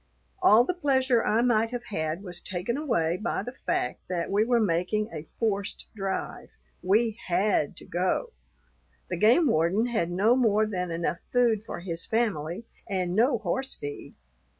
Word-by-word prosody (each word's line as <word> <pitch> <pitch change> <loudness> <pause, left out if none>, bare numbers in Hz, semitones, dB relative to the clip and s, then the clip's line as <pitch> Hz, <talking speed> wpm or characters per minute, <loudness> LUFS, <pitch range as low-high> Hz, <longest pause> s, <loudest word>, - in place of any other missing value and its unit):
All 220 +3 +7
the 315 - -1
pleasure 265 -7 +2
I 225 +3 +2
might 225 -2 +2
have 245 0 -5
had 170 -5 -3
was 180 -3 -7
taken 185 +6 -3
away 180 - 0
by 210 -1 -2
the 245 - -7
fact 125 - 0
that 175 -1 -2
we 205 +2 +3
were 240 +1 +2
making 210 +2 0
a 155 -1 -7
forced 205 -3 -2
drive. 195 -2 -4 0.3
We 215 +4 +2
had 185 -3 +1
to - - -9
go. 185 - -1 0.8
The 175 - -1
game 235 - +5
warden 190 - +2
had 225 -8 -1
no 200 +7 +3
more 220 -4 +3
than 180 -4 -3
enough 170 0 -2
food 235 -4 +2
for 220 - -7
his 170 -2 -4
family, 205 -4 -1 0.2
and 185 -2 -1
no 240 +4 +3
horse 225 +6 -3
feed. 145 0 -8
210 Hz, 165 wpm, -27 LUFS, 175-235 Hz, 0.8 s, All